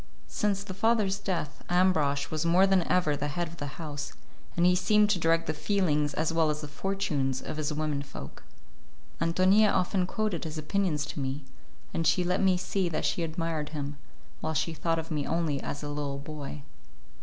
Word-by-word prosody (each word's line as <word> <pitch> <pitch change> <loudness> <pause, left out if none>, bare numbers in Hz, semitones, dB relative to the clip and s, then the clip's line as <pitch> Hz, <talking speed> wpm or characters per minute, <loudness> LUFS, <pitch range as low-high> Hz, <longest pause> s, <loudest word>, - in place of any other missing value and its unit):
Since 200 -1 +1
the 195 - -6
father's 205 -1 +2
death, 175 -7 -3
Ambrosch 155 -6 +2
was 155 -1 0
more 175 +3 +5
than 195 -1 +4
ever 175 -5 +2
the 145 +1 -2
head 175 +4 -2
of 165 +1 -11
the 145 -2 -6
house 145 -3 -5 0.4
and 170 - +4
he 180 - +6
seemed 210 +3 +4
to 190 - +2
direct 165 0 +3
the 155 - -1
feelings 150 -3 +1
as 160 +1 0
well 165 -1 +3
as 150 0 -1
the 150 - -5
fortunes 145 -5 -1
of 155 - -6
his 155 0 -1
women 150 -1 -1
folk. 135 - -9 0.8
Ántonia 185 +5 +4
often 185 0 +1
quoted 210 -4 -1
his 160 -1 -5
opinions 155 -1 0
to 145 - -6
me, 135 +1 -3 0.5
and 165 -1 +1
she 170 +3 +3
let 180 +2 +1
me 190 -2 +4
see 185 0 -1
that 155 - -2
she - - 0
admired 165 -2 -2
him, 145 -2 -4 0.4
while 160 - -2
she 165 +4 0
thought 165 +2 0
of 165 +1 -5
me 150 -2 -1
only 160 -4 0
as 145 - -5
a 145 - -3
little 145 -1 -3
boy. 145 0 -7
165 Hz, 195 wpm, -29 LUFS, 150-185 Hz, 0.8 s, he